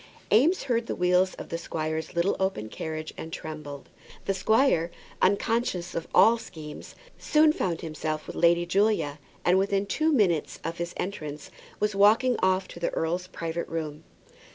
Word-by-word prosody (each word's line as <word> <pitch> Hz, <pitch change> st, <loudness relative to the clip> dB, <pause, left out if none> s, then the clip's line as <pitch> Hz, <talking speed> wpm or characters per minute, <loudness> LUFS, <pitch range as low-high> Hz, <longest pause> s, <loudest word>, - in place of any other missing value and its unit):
Eames 300 Hz, -, +4 dB
heard 235 Hz, -3 st, 0 dB
the -, -, -2 dB
wheels 180 Hz, +1 st, +2 dB
of -, -, -9 dB
the 165 Hz, -, -3 dB
squire's 160 Hz, -1 st, -3 dB
little 170 Hz, +3 st, +2 dB
open 190 Hz, -, -1 dB
carriage 155 Hz, +4 st, -5 dB
and 160 Hz, -, -7 dB
trembled. 155 Hz, -4 st, -7 dB, 0.4 s
The 195 Hz, -, +1 dB
squire, 205 Hz, -3 st, +3 dB, 0.3 s
unconscious 200 Hz, -2 st, +1 dB
of 165 Hz, -, -4 dB
all 230 Hz, +1 st, +6 dB
schemes, 155 Hz, -7 st, -10 dB, 0.2 s
soon 305 Hz, 0 st, +4 dB
found 175 Hz, -, -2 dB
himself 155 Hz, -1 st, -4 dB
with -, -, -8 dB
Lady 170 Hz, 0 st, +4 dB
Julia, 185 Hz, -5 st, +1 dB, 0.3 s
and 180 Hz, +2 st, +5 dB
within 200 Hz, 0 st, +1 dB
two 310 Hz, +10 st, +1 dB
minutes 190 Hz, -, +2 dB
of 165 Hz, +1 st, -4 dB
his 170 Hz, 0 st, -4 dB
entrance 150 Hz, -6 st, -5 dB, 0.3 s
was 210 Hz, 0 st, +1 dB
walked 205 Hz, +5 st, +5 dB
off 185 Hz, 0 st, +2 dB
to -, -, -9 dB
the 170 Hz, -, 0 dB
earl's 175 Hz, +3 st, -1 dB
private 165 Hz, -2 st, -4 dB
room. 155 Hz, -2 st, -5 dB
175 Hz, 160 wpm, -27 LUFS, 160-205 Hz, 0.4 s, all